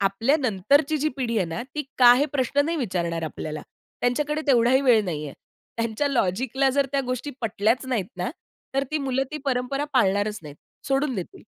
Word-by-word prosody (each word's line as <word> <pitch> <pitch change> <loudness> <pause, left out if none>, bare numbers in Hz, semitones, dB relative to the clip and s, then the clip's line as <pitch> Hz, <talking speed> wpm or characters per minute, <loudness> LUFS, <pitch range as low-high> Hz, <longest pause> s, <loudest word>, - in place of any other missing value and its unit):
आपल्या 210 +8 +2
नंतरची 275 - +2
जी 305 +2 +1
पिढी 240 -4 -1
आहे 180 - 0
ना, 165 +4 -4
ती 300 - -1 0.2
का 245 -1 +9
हे 285 +4 +2
प्रश्न 280 +1 +1
नाही 335 +2 -1
विचारणार 170 - -2
आपल्याला. 155 -1 -5 0.4
त्यांच्याकडे 295 +5 0
तेवढाही 250 0 +4
वेळ 240 -5 +5
नाही 155 -5 -3
आहे. 140 - -9 0.4
त्यांच्या 230 +4 -1
लॉजिकला 260 +3 +1
जर 280 +1 +1
त्या 275 - +2
गोष्टी 255 +3 -3
पटल्याच 225 +2 0
नाहीत 230 -8 -1
ना, - - -2 0.4
तर 275 0 +1
ती 310 - 0
मुलं 270 -2 0
ती 300 - -3
परंपरा 270 +2 -1
पाळणारच 205 -2 +2
नाहीत. 150 -1 -10 0.3
सोडून 270 0 +1
देतील. 185 -5 -7
250 Hz, 180 wpm, -24 LUFS, 200-275 Hz, 0.4 s, का